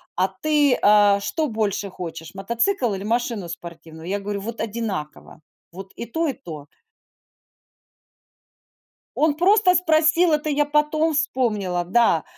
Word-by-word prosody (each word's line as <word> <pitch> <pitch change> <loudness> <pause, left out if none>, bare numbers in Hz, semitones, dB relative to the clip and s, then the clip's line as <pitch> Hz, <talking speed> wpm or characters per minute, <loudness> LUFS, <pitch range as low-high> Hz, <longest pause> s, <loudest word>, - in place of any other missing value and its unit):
"А 185 +2 +2
ты, 290 +7 +1
а, 205 -1 +5
что 310 +9 -2
больше 210 -4 -2
хочешь: 165 -3 -8
мотоцикл 235 - 0
или 195 0 -5
машину 225 -4 -2
спортивную?" 165 -1 -10
Я 200 +2 -2
говорю: 200 0 -5
"Вот 230 +3 -6
одинаково. 200 -11 -5 0.3
Вот 190 +2 -10
и - - -6
то, 320 +8 -2
и 275 - -1
то". 155 - -10 2.5
Он 310 -1 +2
просто 370 +3 +4
спросил, 325 0 +3
это 300 0 0
я 295 0 +2
потом 300 +2 +1
вспомнила. 210 -11 -1
Да. 180 -3 +2
225 Hz, 130 wpm, -22 LUFS, 190-300 Hz, 2.5 s, а